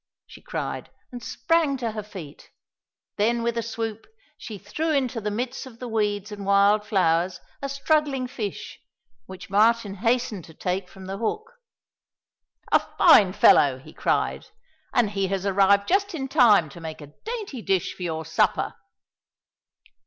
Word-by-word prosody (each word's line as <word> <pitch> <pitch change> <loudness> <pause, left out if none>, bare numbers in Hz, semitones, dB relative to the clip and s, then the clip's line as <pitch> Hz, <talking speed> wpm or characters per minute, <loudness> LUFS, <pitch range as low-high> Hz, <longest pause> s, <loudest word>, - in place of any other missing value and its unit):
she - - -14
cried, - - -5 0.2
and 245 -1 -7
sprang 325 -4 +1
to 235 -3 -2
her 215 0 -5
feet. 185 -8 -11 0.7
Then, 230 +3 +1
with 235 0 0
a 230 - 0
swoop, 225 -1 -5 0.3
she 215 - -8
threw 300 - -3
into 260 -6 0
the 210 - -2
midst 245 +5 -4
of 235 -3 -13
the 250 - -7
weeds 210 -2 -1
and 205 -1 -7
wild 200 +1 +4
flowers 180 -4 +1 0.2
a 275 - -3
struggling 275 -1 +1
fish 210 -6 -6 0.5
which 190 0 -10
Martin 215 0 +3
hastened 230 -3 0
to 160 - -15
take 180 +1 -3
from 190 -1 -12
the 195 +1 -5
hook. 430 - -3 1.2
"A - - +6 0.2
fine 195 -3 +7
fellow!" 140 -8 +5
he 130 - -14
cried, - - -1 0.4
"and 235 -4 +2
he 195 -2 -1
has 195 0 -2
arrived 200 +1 +3
just 395 0 +1
in 270 -4 -3
time 240 - +5
to 170 +5 -12
make 160 -1 -7
a 145 0 -12
dainty 430 - -5
dish 195 -4 0
for - - -15
your 160 -2 -3
supper." - - +1
210 Hz, 160 wpm, -25 LUFS, 195-250 Hz, 1.2 s, fine